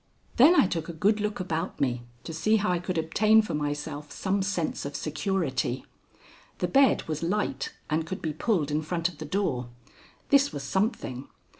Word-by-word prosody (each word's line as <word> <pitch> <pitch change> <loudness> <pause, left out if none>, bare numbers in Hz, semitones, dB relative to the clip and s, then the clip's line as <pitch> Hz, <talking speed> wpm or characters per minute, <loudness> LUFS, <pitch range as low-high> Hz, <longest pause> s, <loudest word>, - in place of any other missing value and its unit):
Then 315 +9 +7
I - - +6
took 165 -3 -3
a - - -4
good 205 +7 +2
look 210 0 -2
about 170 -1 -3
me 125 -3 0 0.2
to 165 - -6
see 215 +8 +2
how 210 -3 +1
I 175 - +1
could 180 0 -3
obtain 215 +7 +4
for - - -4
myself 145 0 -3
some 195 +1 -1
sense 190 -4 -1
of 140 0 -5
security. 155 - -1 0.7
The - - 0
bed 275 -1 +4
was 155 -1 -3
light 170 -6 -1 0.2
and 155 +1 0
could 185 +4 -5
be 155 -2 -3
pulled 155 -3 0
in 150 +1 +1
front 165 +2 -1
of 170 - -15
the 155 - -5
door. 145 -9 -1 0.6
This 280 0 +5
was 140 - -5
something. 190 - -1
165 Hz, 185 wpm, -27 LUFS, 150-205 Hz, 0.7 s, Then